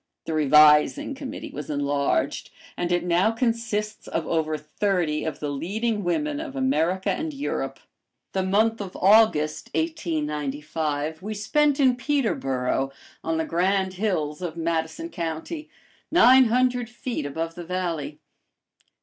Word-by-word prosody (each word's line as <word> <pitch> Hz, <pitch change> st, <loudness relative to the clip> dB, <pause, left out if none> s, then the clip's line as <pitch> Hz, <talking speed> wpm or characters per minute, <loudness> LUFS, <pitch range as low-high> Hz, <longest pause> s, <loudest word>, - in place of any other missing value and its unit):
The 160 Hz, -, -3 dB
Revising 150 Hz, -, +5 dB
Committee 270 Hz, -1 st, -7 dB
was 150 Hz, +2 st, -7 dB
enlarged, 145 Hz, -1 st, 0 dB, 0.3 s
and 175 Hz, 0 st, -2 dB
it 175 Hz, -, +1 dB
now 175 Hz, +4 st, +3 dB
consists 225 Hz, -2 st, -2 dB
of 165 Hz, -, -2 dB
over 155 Hz, -1 st, 0 dB
thirty 155 Hz, 0 st, -1 dB
of 160 Hz, -, -4 dB
the 145 Hz, -1 st, -3 dB
leading 210 Hz, +9 st, -2 dB
women 295 Hz, -, -1 dB
of 305 Hz, -4 st, -6 dB
America 190 Hz, -, +1 dB
and 320 Hz, 0 st, -2 dB
Europe.[A] 280 Hz, -, -3 dB, 0.5 s
The 190 Hz, -, 0 dB
month 215 Hz, +4 st, +2 dB
of 190 Hz, -2 st, -7 dB
August, 185 Hz, -7 st, +4 dB
1895, 150 Hz, -, -2 dB
we 215 Hz, +3 st, -5 dB
spent 290 Hz, +7 st, +2 dB
in 260 Hz, -3 st, +4 dB
Peterboro, 135 Hz, -, 0 dB, 0.3 s
on 165 Hz, 0 st, -1 dB
the 160 Hz, -, 0 dB
grand 190 Hz, +2 st, +1 dB
hills 180 Hz, -6 st, -2 dB
of 170 Hz, -2 st, -4 dB
Madison 165 Hz, -, -2 dB
County, 175 Hz, -, -5 dB, 0.4 s
nine 265 Hz, -7 st, +7 dB
hundred 245 Hz, 0 st, +1 dB
feet 240 Hz, -, -4 dB
above 165 Hz, +3 st, -4 dB
the 175 Hz, -, -8 dB
valley. 165 Hz, -5 st, -3 dB
180 Hz, 130 wpm, -25 LUFS, 155-235 Hz, 0.5 s, nine